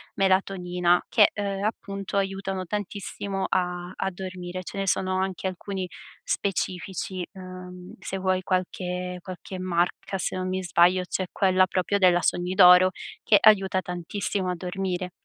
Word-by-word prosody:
melatonina, 180 Hz, -2 st, +2 dB
che, 210 Hz, -, +5 dB
ehm, 200 Hz, -1 st, -3 dB
appunto 200 Hz, -2 st, -3 dB
aiutano 195 Hz, -1 st, -2 dB
tantissimo 200 Hz, 0 st, -4 dB
a 180 Hz, -1 st, -1 dB
a 190 Hz, -, -1 dB
dormire. 185 Hz, 0 st, -6 dB
Ce 185 Hz, -, -8 dB
ne 195 Hz, -, -2 dB
sono 185 Hz, 0 st, +1 dB
anche 190 Hz, 0 st, -2 dB
alcuni 185 Hz, 0 st, -4 dB, 0.4 s
specifici, 185 Hz, -1 st, -2 dB
ehm, 185 Hz, -1 st, -10 dB
se 195 Hz, -, -4 dB
vuoi 185 Hz, 0 st, +1 dB
qualche 180 Hz, -1 st, -2 dB
qualche 185 Hz, +1 st, -8 dB
marca 180 Hz, +1 st, -1 dB
se 185 Hz, -, -2 dB
non 185 Hz, 0 st, -2 dB
mi 185 Hz, 0 st, -1 dB
sbaglio 180 Hz, +1 st, +4 dB
c'è 185 Hz, -, -1 dB
quella 185 Hz, -1 st, +3 dB
proprio 185 Hz, +2 st, 0 dB
della 180 Hz, -2 st, +5 dB
"Sogni 180 Hz, +1 st, 0 dB
d'Oro", 180 Hz, -1 st, +8 dB, 0.3 s
che 205 Hz, -, +6 dB
aiuta 195 Hz, -3 st, +5 dB
tantissimo 180 Hz, +2 st, -3 dB
a 180 Hz, -, -1 dB
dormire. 180 Hz, 0 st, -3 dB
185 Hz, 140 wpm, -26 LUFS, 180-195 Hz, 0.4 s, d'Oro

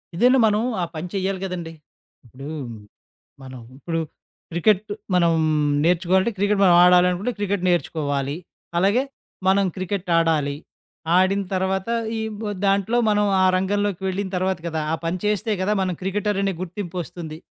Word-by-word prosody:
ఇదేనా 250 Hz, +8 st, +4 dB
మనం 210 Hz, +1 st, +2 dB, 0.2 s
ఆ -, -, 0 dB
పని 160 Hz, +3 st, -4 dB
చెయ్యాలి 195 Hz, -1 st, -1 dB
కదండి! 175 Hz, -3 st, -5 dB, 0.5 s
ఇప్పుడు 135 Hz, +5 st, -10 dB, 0.9 s
మనం 130 Hz, -2 st, -9 dB, 0.2 s
ఇప్పుడు 165 Hz, +2 st, -3 dB, 0.5 s
క్రికెట్టు 200 Hz, +5 st, +1 dB, 0.2 s
మనం 170 Hz, -2 st, +4 dB, 0.5 s
నేర్చుకోవాలంటే 185 Hz, +5 st, +2 dB
క్రికెట్టు 200 Hz, 0 st, +2 dB
మనం 175 Hz, -1 st, +6 dB
ఆడాలనుకుంటే, 180 Hz, +5 st, +4 dB
క్రికెట్టు 200 Hz, -2 st, -1 dB
నేర్చుకోవాలి. 145 Hz, -4 st, -1 dB, 0.4 s
అలాగే 200 Hz, +8 st, +3 dB, 0.5 s
మనం 195 Hz, +1 st, +4 dB
క్రికెట్టు 185 Hz, -1 st, -3 dB
ఆడాలి. 155 Hz, -4 st, +1 dB, 0.6 s
ఆడిన 190 Hz, +2 st, +3 dB
తర్వాత 190 Hz, +2 st, -1 dB, 0.3 s
ఈ -, -, -2 dB, 0.2 s
బ్ 220 Hz, -, -6 dB, 0.2 s
దాంట్లో 200 Hz, +4 st, +2 dB
మనం 210 Hz, 0 st, +3 dB, 0.2 s
ఆ -, -, +4 dB
రంగంలోకి 200 Hz, 0 st, -1 dB
వెళ్ళిన 195 Hz, +1 st, -2 dB
తర్వాత 185 Hz, -1 st, 0 dB
గదా! 160 Hz, -1 st, -2 dB
ఆ -, -, +2 dB
పని 170 Hz, +2 st, -1 dB
చేస్తే 210 Hz, +2 st, 0 dB
గదా 200 Hz, +3 st, +1 dB
మనం 185 Hz, -1 st, 0 dB
క్రికెటరనే 195 Hz, 0 st, 0 dB
గుర్తింపొస్తుంది. 175 Hz, -3 st, -6 dB
185 Hz, 135 wpm, -22 LUFS, 170-200 Hz, 0.9 s, మనం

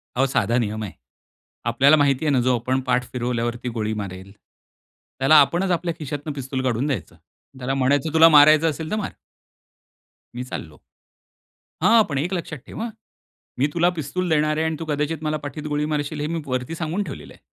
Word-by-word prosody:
अहो, 130 Hz, +2 st, +3 dB
साधा 120 Hz, -3 st, +1 dB
नियम 110 Hz, -1 st, -2 dB
आहे. 100 Hz, -, -5 dB, 0.7 s
आपल्याला 135 Hz, +6 st, +5 dB
माहिती 140 Hz, 0 st, +2 dB
आहे 150 Hz, -, +2 dB
ना 130 Hz, -, +3 dB
जो 125 Hz, +1 st, +2 dB
आपण 130 Hz, +3 st, 0 dB
पाठ 125 Hz, 0 st, +2 dB
फिरवल्यावरती 120 Hz, 0 st, -2 dB
गोळी 110 Hz, 0 st, -1 dB
मारेल. 95 Hz, 0 st, -8 dB, 0.9 s
त्याला 135 Hz, +4 st, +5 dB
आपणच 175 Hz, +6 st, +1 dB
आपल्या 170 Hz, 0 st, 0 dB
खिशातनं 145 Hz, +1 st, -5 dB
पिस्तूल 135 Hz, -1 st, -4 dB
काढून 125 Hz, +2 st, 0 dB
द्यायचं. 130 Hz, -, -3 dB, 0.4 s
त्याला 130 Hz, +1 st, -2 dB
म्हणायचं 140 Hz, +3 st, +1 dB
"तुला 165 Hz, 0 st, +8 dB
मारायचं 155 Hz, +1 st, +7 dB
असेल 155 Hz, +1 st, -5 dB
तर -, -, +1 dB
मार." 215 Hz, -2 st, -3 dB, 1.2 s
मी 125 Hz, -, -4 dB
चाललो. -, -, -7 dB, 1.0 s
हां! 230 Hz, -1 st, +6 dB
पण 140 Hz, -, -2 dB
एक 170 Hz, +7 st, -1 dB
लक्षात 170 Hz, -4 st, -4 dB
ठेव -, -, -9 dB
हां. 235 Hz, -, -2 dB, 0.7 s
मी 140 Hz, -, +3 dB
तुला 170 Hz, +1 st, +3 dB
पिस्तूल 175 Hz, +5 st, -2 dB
देणार 155 Hz, -1 st, +2 dB
आहे 160 Hz, -, +1 dB
आणि 160 Hz, 0 st, -1 dB
तू 165 Hz, -, -5 dB
कदाचित 150 Hz, +1 st, -2 dB
मला 155 Hz, 0 st, 0 dB
पाठीत 145 Hz, +2 st, -6 dB
गोळी 150 Hz, 0 st, -1 dB
मारशील 150 Hz, 0 st, -2 dB
हे 150 Hz, -, -1 dB
मी 165 Hz, 0 st, -3 dB
वरती 130 Hz, +4 st, -3 dB
सांगून 165 Hz, +5 st, -2 dB
ठेवलेलं -, -, -9 dB
आहे. -, -, -20 dB
145 Hz, 185 wpm, -23 LUFS, 125-160 Hz, 1.2 s, तुला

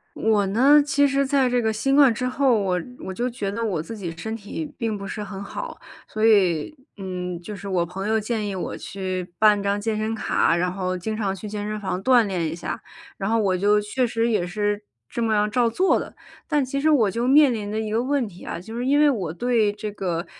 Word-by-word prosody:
我 215 Hz, -2 st, +2 dB
呢， 265 Hz, +9 st, +5 dB
其 285 Hz, 0 st, +3 dB
实 275 Hz, 0 st, +1 dB
在 270 Hz, -1 st, +2 dB
这 245 Hz, 0 st, +1 dB
个 220 Hz, -1 st, +1 dB
新 270 Hz, +6 st, 0 dB
冠 280 Hz, -3 st, +7 dB
之 250 Hz, +3 st, -3 dB
后， 255 Hz, -2 st, +2 dB
我 185 Hz, -2 st, 0 dB, 0.3 s
我 190 Hz, -, -5 dB
就 245 Hz, +5 st, -1 dB
觉 210 Hz, -5 st, -4 dB
得 230 Hz, +3 st, -3 dB
我 190 Hz, -8 st, -1 dB
自 225 Hz, +9 st, -7 dB
己 185 Hz, -5 st, -5 dB
身 220 Hz, +7 st, -5 dB
体 225 Hz, +8 st, -5 dB
并 225 Hz, -4 st, -2 dB
不 200 Hz, -, -7 dB
是 210 Hz, +2 st, -5 dB
很 200 Hz, -1 st, -7 dB
好， -, -, -6 dB, 0.3 s
所 215 Hz, +1 st, +1 dB
以， 195 Hz, -, +3 dB, 0.2 s
嗯， 180 Hz, -3 st, -5 dB
就 210 Hz, +4 st, -7 dB
是 200 Hz, 0 st, -8 dB
我 175 Hz, -3 st, +1 dB
朋 195 Hz, +4 st, -5 dB
友 220 Hz, 0 st, +2 dB
建 215 Hz, 0 st, -2 dB
议 195 Hz, -, -4 dB
我 185 Hz, -, -4 dB
去 185 Hz, -2 st, -5 dB
办 210 Hz, -2 st, +5 dB
张 200 Hz, +1 st, 0 dB
健 215 Hz, +1 st, -1 dB
身 215 Hz, +1 st, -1 dB
卡， 220 Hz, -5 st, +1 dB
然 180 Hz, +1 st, 0 dB
后 185 Hz, -1 st, -2 dB
经 215 Hz, +4 st, -3 dB
常 205 Hz, -3 st, -1 dB
去 200 Hz, +2 st, -7 dB
健 205 Hz, 0 st, -4 dB
身 215 Hz, 0 st, -4 dB
房 190 Hz, -2 st, -3 dB
锻 245 Hz, 0 st, +5 dB
炼 180 Hz, -4 st, -2 dB
一 160 Hz, -, -5 dB
下， 170 Hz, -, -5 dB, 0.4 s
然 195 Hz, +1 st, -2 dB
后 230 Hz, -, +3 dB
我 195 Hz, -4 st, +2 dB
就 205 Hz, +3 st, +3 dB
确 210 Hz, +5 st, -1 dB
实 230 Hz, 0 st, 0 dB
也 210 Hz, -6 st, +1 dB
是 205 Hz, +3 st, -1 dB, 0.3 s
这 235 Hz, -, -3 dB
么 225 Hz, -1 st, +1 dB
样 210 Hz, 0 st, +2 dB
照 235 Hz, +2 st, +2 dB
做 370 Hz, +11 st, +2 dB
的。 -, -, -9 dB, 0.3 s
但 295 Hz, -3 st, +2 dB
其 275 Hz, +2 st, -3 dB
实 310 Hz, +2 st, +3 dB
我 245 Hz, -9 st, +4 dB
就 235 Hz, +6 st, -1 dB
面 285 Hz, -1 st, +6 dB
临 205 Hz, -2 st, -4 dB
着 215 Hz, -, -2 dB
一 220 Hz, -1 st, -2 dB
个 225 Hz, +2 st, +1 dB
问 270 Hz, -1 st, 0 dB
题 180 Hz, -2 st, -13 dB
啊， -, -, -5 dB
就 220 Hz, +6 st, -9 dB
是 245 Hz, -, -2 dB
因 280 Hz, +3 st, +3 dB
为 300 Hz, 0 st, +6 dB
我 195 Hz, -, -1 dB
对 225 Hz, +1 st, +1 dB
这 210 Hz, 0 st, -6 dB
个 175 Hz, -4 st, -3 dB
215 Hz, 265 characters per minute, -23 LUFS, 195-240 Hz, 0.4 s, 冠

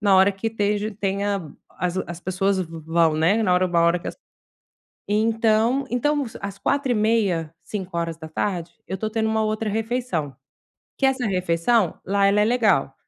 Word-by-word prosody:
na 200 Hz, -2 st, +4 dB
hora 190 Hz, +2 st, +6 dB
que 195 Hz, +3 st, -5 dB
esteja 210 Hz, -1 st, -1 dB
tenha 195 Hz, -4 st, -1 dB, 0.2 s
as 180 Hz, 0 st, -3 dB
as 170 Hz, 0 st, -7 dB
pessoas 190 Hz, +2 st, 0 dB
v 165 Hz, -2 st, -6 dB
vão, 165 Hz, -1 st, +3 dB
né, 190 Hz, +8 st, +3 dB
na 185 Hz, -, +2 dB
hora 180 Hz, +1 st, +3 dB
uma 170 Hz, -1 st, +1 dB
hora 170 Hz, +1 st, +3 dB
que -, -, -10 dB
as -, -, -7 dB, 0.9 s
Então 225 Hz, +4 st, +2 dB
então 290 Hz, +4 st, +1 dB, 0.2 s
às 200 Hz, 0 st, -6 dB
16h30, 215 Hz, -, +1 dB
17h 170 Hz, -2 st, -3 dB
eu 190 Hz, -, -3 dB
tô 215 Hz, -, -2 dB
tendo 220 Hz, 0 st, 0 dB
uma 220 Hz, 0 st, +1 dB
outra 215 Hz, 0 st, -1 dB
refeição, 220 Hz, -, -2 dB, 0.6 s
que -, -, 0 dB
essa 260 Hz, -2 st, +1 dB
refeição 180 Hz, +1 st, +1 dB
lá 200 Hz, +1 st, +3 dB
ela 200 Hz, +1 st, +3 dB
é -, -, +4 dB
legal, 215 Hz, -, +2 dB
200 Hz, 160 wpm, -23 LUFS, 175-220 Hz, 0.9 s, hora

